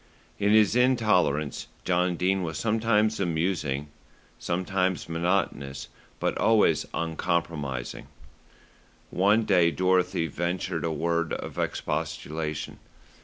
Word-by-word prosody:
In 100 0 +2
his 110 0 +5
intolerance 105 - +2 0.2
John 90 0 +1
Dene 95 +2 +1
was 80 -3 -3
sometimes 110 -1 +1
amusing, 80 -5 -1 0.5
sometimes 90 0 -1
monotonous; 80 -5 -1 0.3
but - - 0
always 110 -2 +3
uncompromising. 80 -6 -2 1.0
One 105 +4 +3
day 85 -4 +4
Dorothy 90 -1 +1
ventured 85 +1 -2
a 80 - 0
word 85 +1 -1
of - - -5
expostulation. 80 0 -3
85 Hz, 95 wpm, -27 LUFS, 80-95 Hz, 1.0 s, his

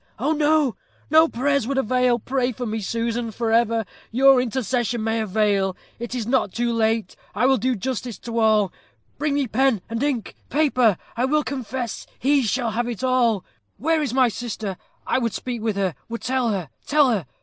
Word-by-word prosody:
Oh! 290 +7 0
oh! 295 -4 +3 0.3
no 320 +1 +7
prayers 280 -2 0
would 275 0 -1
avail. 250 -1 +2
Pray 255 +2 -1
for 245 +3 -5
me, 220 0 -2
Susan 230 +2 -2
for 225 +1 -2
ever! 230 -1 +2 0.2
Your 265 +2 +5
intercession 240 -1 -1
may 225 0 0
avail. 200 -2 +1 0.2
It 240 +1 -5
is 235 -3 -2
not 240 -4 +1
too 235 +2 -1
late. 225 -3 0 0.2
I - - +2
will 265 0 +4
do 255 +3 0
justice 245 +1 -4
to 230 -1 -4
all. 215 -4 +3 0.5
Bring 295 -1 0
me 285 -1 +1
pen 250 0 +2
and 230 +1 -2
ink 275 -6 -1 0.2
paper 255 - +3 0.2
I 240 +3 +1
will 300 +3 +2
confess 255 -4 -4
he 280 +2 +3
shall 240 0 0
have 240 +1 -3
all. 240 -6 +2 0.3
Where 315 +7 +1
is 285 -6 -1
my 255 0 +4
sister? 220 -3 -4 0.3
I - - +1
would 230 -3 -1
speak 245 -3 -4
with 220 -2 -1
her 195 -3 0 0.2
would 230 0 -5
tell 255 -1 +1
her 190 -8 -2 0.2
tell 290 -2 +4
her. 195 - -1
240 Hz, 185 wpm, -23 LUFS, 220-265 Hz, 0.5 s, no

